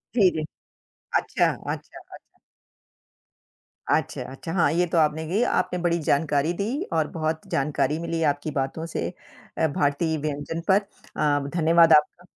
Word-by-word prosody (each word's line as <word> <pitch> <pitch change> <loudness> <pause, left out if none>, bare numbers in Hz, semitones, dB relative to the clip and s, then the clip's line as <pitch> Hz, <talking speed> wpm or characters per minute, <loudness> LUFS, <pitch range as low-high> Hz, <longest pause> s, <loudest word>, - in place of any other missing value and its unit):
जी, 200 -6 +6
जी। 155 - -3 0.8
अच्छा, - - +1 0.2
अच्छा, - - -9
अच्छा। - - -14 1.7
अच्छा, - - 0
अच्छा। 135 +5 -7
हाँ, 165 -6 +3
ये 175 +1 +2
तो 170 - -1
आपने 155 0 +2
कही, 195 +7 0
आपने 180 - 0
बड़ी 170 -1 +1
जानकारी 145 +1 +1
दी 200 - -1 0.3
और - - +1
बहुत 160 -2 -3
जानकारी 150 +1 0
मिली 165 -1 -3
आपकी 145 +1 0
बातों 140 +3 -2
से 165 - -3 0.5
अ, 160 - +3
भारतीय 145 +2 0
व्यंजन 150 +2 -4
पर 200 +1 +4 0.3
अम, 145 -1 +1
धन्यवाद 165 0 +5
आपका। 155 +4 +3
160 Hz, 145 wpm, -25 LUFS, 145-170 Hz, 1.7 s, जी